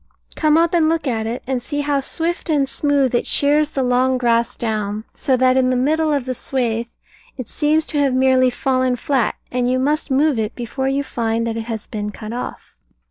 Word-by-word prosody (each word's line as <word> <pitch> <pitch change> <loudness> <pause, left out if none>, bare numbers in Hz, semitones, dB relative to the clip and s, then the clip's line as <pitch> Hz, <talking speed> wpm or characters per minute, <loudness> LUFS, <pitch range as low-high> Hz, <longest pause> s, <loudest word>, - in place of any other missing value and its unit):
Come 310 -1 +3
up 335 +2 +2
and 325 -2 +3
look 325 -1 0
at 225 -4 -1
it, 235 +3 -4
and 260 -1 -2
see 290 +3 -3
how 285 -1 0
swift 330 +6 -3
and 285 -3 +2
smooth 280 -3 +1
it 240 - 0
shears 295 +1 +3
the 270 -3 -2
long 255 +1 +2
grass 235 -1 +1
down, 215 -2 -2
so 260 -2 0
that 255 +1 +3
in 255 -1 +3
the 255 - +1
middle 310 +5 +1
of 280 -4 0
the 255 - -2
swathe 235 -2 -2 0.5
it 255 -4 -6
seems 310 +1 +1
to 295 - -2
have 275 -3 +2
merely 260 0 +4
fallen 255 0 0
flat, 255 -1 0 0.2
and 245 0 0
you 255 - +1
must 295 +4 0
move 275 -1 +2
it 215 +1 -2
before 260 +2 -3
you 275 +1 0
find 230 -3 -1
that 230 -1 -2
it 225 -1 -4
has 225 -2 -5
been 210 -1 -4
cut 215 +2 -8
off. 245 - -7
260 Hz, 215 wpm, -20 LUFS, 240-290 Hz, 0.5 s, merely